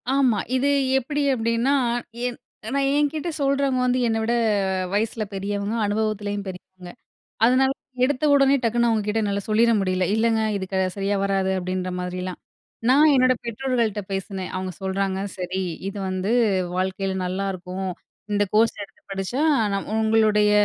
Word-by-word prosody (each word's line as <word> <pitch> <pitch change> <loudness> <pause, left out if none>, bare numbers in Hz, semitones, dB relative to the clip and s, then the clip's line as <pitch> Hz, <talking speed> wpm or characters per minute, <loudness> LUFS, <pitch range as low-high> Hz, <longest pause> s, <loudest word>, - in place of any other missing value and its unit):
ஆமா. 260 -6 +3 0.2
இது 265 +2 +2 0.3
எப்டி 290 +3 -1
அப்டின்னா, 230 +2 +1 0.5
என் 245 -1 -3 0.4
நான் 275 -1 +2
என்கிட்ட 295 +3 0
சொல்றவங்க 275 -1 +1
வந்து 250 0 +2
என்ன 225 -1 +1
விட, 230 +2 0 0.6
வயசுல 220 +1 0
பெரியவங்க 200 +2 -2
அனுபவத்திலயும் 205 -1 -2
பெரியவங்க. 185 -1 -10 0.5
அதனால 260 +3 +4 0.3
எடுத்த 280 +2 0
உடனே 275 -1 +5
டக்குனு 235 +1 +2
அவுங்க 220 -2 +1
கிட்ட 210 +1 0
என்னால 200 -1 -1
சொல்லிற 230 +2 +4
முடியல. 185 -1 0
"இல்லைங்க 225 0 +2
இது 195 - -3
க - - 0 0.2
சரியா 200 +1 0
வராது" 195 -1 +1
அப்படின்ற 185 0 -3
மாதிரிலாம். 180 0 -4 0.5
நான் 295 +4 +6
என்னோட 255 -1 +4
பெற்றோர்கள்ட்ட 235 -2 -1
பேசினேன். 195 -1 -4
அவுங்க 185 0 -3
சொல்றாங்க. 190 0 -1 0.2
சரி 185 0 -3 0.3
இது 200 +1 -6
வந்து 185 +2 -2 0.5
வாழ்க்கையில 190 +1 -1
நல்லாருக்கும். 185 0 -3 0.4
இந்த 205 0 +2
கோர்ஸ் 225 +1 +3
எடுத்து 200 - -13
படிச்சா 195 +7 -3 0.3
நம் 200 0 -3
உங்களுடைய 220 -1 +3
210 Hz, 140 wpm, -23 LUFS, 190-245 Hz, 0.6 s, நான்